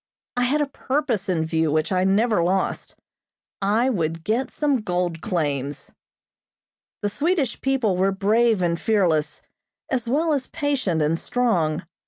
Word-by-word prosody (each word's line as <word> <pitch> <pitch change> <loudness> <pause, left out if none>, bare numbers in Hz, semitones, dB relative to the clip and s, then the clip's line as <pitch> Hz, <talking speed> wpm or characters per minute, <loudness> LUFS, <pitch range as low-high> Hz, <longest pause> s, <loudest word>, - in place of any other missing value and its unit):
I 245 0 +2
had 290 +4 +1
a - - +2
purpose 265 -7 -2
in 165 -3 +1
view 160 -1 0
which 155 +3 0
I 185 0 +2
never 210 +1 +3
lost. 185 +3 -1 0.7
I 220 +6 +2
would 165 -5 -2
get 235 +7 0
some 290 -3 +1
gold 180 -6 -2
claims. 145 -5 -2 1.1
The 205 - +1
Swedish 290 - -1
people 255 -8 +1
were 190 +2 +2
brave 210 +1 +2
and 170 -1 0
fearless, 175 -9 +1 0.5
as 245 -3 0
well 310 +6 +1
as 270 -3 -1
patient 255 - 0
and 160 +2 +1
strong. 180 -10 0
200 Hz, 145 wpm, -23 LUFS, 170-250 Hz, 1.1 s, never